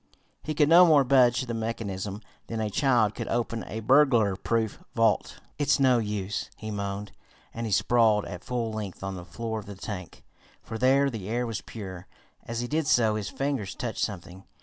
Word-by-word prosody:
He 155 - -4
could 150 -1 +4
no 170 +3 +8
more 150 -4 +6
budge 125 -2 +4
the 120 - -4
mechanism 105 -3 -4 0.2
than 115 - -4
a 110 -1 -2
child 120 -3 +2
could - - -5
open 115 -1 -1
a 110 - -5
burglar 120 -5 +4
proof 110 +2 -2
vault. 115 -2 +1 0.2
"It's 145 -1 +2
no 130 -3 +4
use," 105 -2 -3
he 110 0 -6
moaned, 100 0 -4 0.4
and 115 0 -4
he - - -5
sprawled 105 +1 +3
at 90 -2 -8
full 120 -3 -2
length 105 -4 -6
on 95 0 -3
the 90 -2 -7
floor 110 +4 -4
of 105 - -11
the 100 - -7
tank, 95 -3 -7 0.4
for 110 0 -6
there 135 +2 +4
the 105 -4 -6
air 120 +2 0
was 115 -3 -4
purer. 95 -5 -8 0.4
As 115 0 -3
he 120 - -3
did 155 +2 -1
so 115 -6 +4
his 105 -2 -3
fingers 135 -9 -3
touched 120 -3 -3
something. 95 -2 -5
110 Hz, 195 wpm, -27 LUFS, 100-125 Hz, 0.4 s, no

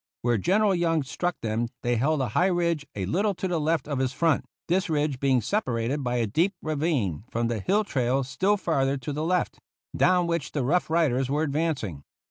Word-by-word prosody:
Where 120 -2 +2
General 200 - +3
Young 165 -3 +1
struck 175 +5 -3
them 115 +1 -1 0.2
they 120 0 +1
held 140 +5 +1
a 130 - -1
high 180 - +2
ridge 170 -5 0
a 95 -2 -2
little 200 - 0
to 190 - -3
the 175 -3 0
left 155 +1 0
of 145 -3 -2
his 130 -1 0
front, 165 -2 +1 0.2
this 185 +2 +1
ridge 150 -3 0
being 130 -3 +2
separated 130 - -1
by 125 -1 -1
a 120 -2 +1
deep 165 - +1
ravine 145 - -1
from 115 0 -1
the 115 -2 -1
hill 200 - +1
trail 130 - 0
still 190 +10 +1
farther 140 -7 0
to 135 +2 -5
the 150 +2 -2
left, 180 +2 0 0.4
down 180 -1 +3
which 170 -4 -2
the 145 - 0
Rough 170 +8 +1
Riders 135 -6 +2
were 150 +3 +1
advancing. 140 - -2
150 Hz, 205 wpm, -26 LUFS, 125-170 Hz, 0.4 s, General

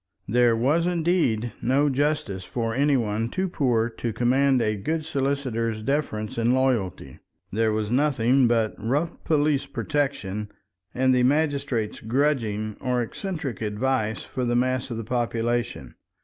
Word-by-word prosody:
There 120 +1 +4
was 150 +9 +2
indeed 160 - +1
no 135 +5 +2
justice 140 -9 0
for 115 +3 -3
any 140 +2 +3
one 110 -1 -1
too 190 +6 -1
poor 120 -9 +1
to 115 0 -4
command 130 +4 +3
a 110 -2 +1
good 155 +10 -2
solicitor's 130 -7 -1
deference 115 -6 -2
and 120 +2 +3
loyalty; 115 - -1 0.3
there 110 +2 +1
was 105 0 -1
nothing 130 -2 +3
but 115 -2 +1
rough 145 +9 -2
police 145 -3 +1
protection 135 -9 -2 0.5
and 130 +1 +3
the 125 - +3
magistrate's 140 -4 0
grudging 110 -4 0
or 125 -2 0
eccentric 150 - -5
advice 110 +1 -1
for 130 - -4
the 120 0 +1
mass 130 +1 0
of 115 - -4
the 115 - -4
population. 120 0 -2
125 Hz, 140 wpm, -25 LUFS, 115-140 Hz, 0.5 s, There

